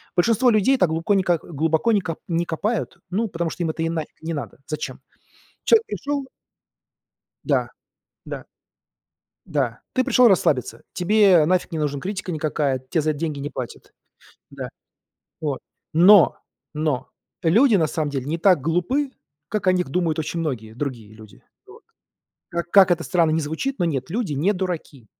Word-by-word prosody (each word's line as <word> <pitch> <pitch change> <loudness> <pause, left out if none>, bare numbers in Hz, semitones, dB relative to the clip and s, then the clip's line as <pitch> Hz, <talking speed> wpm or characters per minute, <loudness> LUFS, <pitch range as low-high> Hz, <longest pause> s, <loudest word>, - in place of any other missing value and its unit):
Большинство 230 +7 +3
людей 220 +5 +3
так 185 -7 +3
глубоко 165 +5 0
не 190 - +2
как 175 -3 +1
глубоко 160 +7 0
не 205 - +3
ко 165 -3 -4
не 170 0 0
копают, 205 +7 -2
ну 215 +6 0
потому 170 -3 -2
что 175 - -4
им 165 - -1
это 160 - -6
и 165 - 0
нафиг 160 -2 -5
не 165 +1 -4
надо. 140 -7 -6
Зачем? 155 - -5 0.6
Человек 455 -1 +4
пришёл 285 -7 -3 1.2
Да - - +1 0.6
да. - - -6 1.0
Да. - - -1
Ты 255 - +2
пришёл 250 -1 +5
расслабиться, 130 - +1
тебе 190 -3 +4
нафиг 180 +2 +1
не 160 - -3
нужна 145 -2 -1
критика 195 +1 -4
никакая, 150 -3 -1
тебе 160 - +1
за 155 - +1
эт 145 - -5
деньги 155 -2 -3
не 145 +1 -4
платят. 125 -2 -8 0.6
Да. - - -6 0.7
О, 145 -4 -1 0.4
но 180 +3 +7 0.4
но, 150 -3 -1 0.3
люди 220 +9 +5
на 165 -5 +3
самом 155 -1 -2
деле 135 -3 -3
не 155 +4 -2
так 180 -2 +4
глупы, 180 - 0 0.4
как 210 +3 -3
о - - +7
них 180 -1 0
думают 165 0 0
очень 165 +2 -3
многие 110 -8 -4
другие 120 -5 -5
люди. 110 -3 -15 0.2
Вот. - - -16 0.7
Как 170 0 -3
как 190 -2 +7
это 170 -1 +2
странно 170 -3 +2
ни 160 +1 +1
звучит, 160 - -3
но 175 - +1
нет, 135 -4 -2
люди 200 -6 -2
не 175 +9 +2
дураки. 175 - -5
165 Hz, 170 wpm, -23 LUFS, 150-195 Hz, 1.2 s, но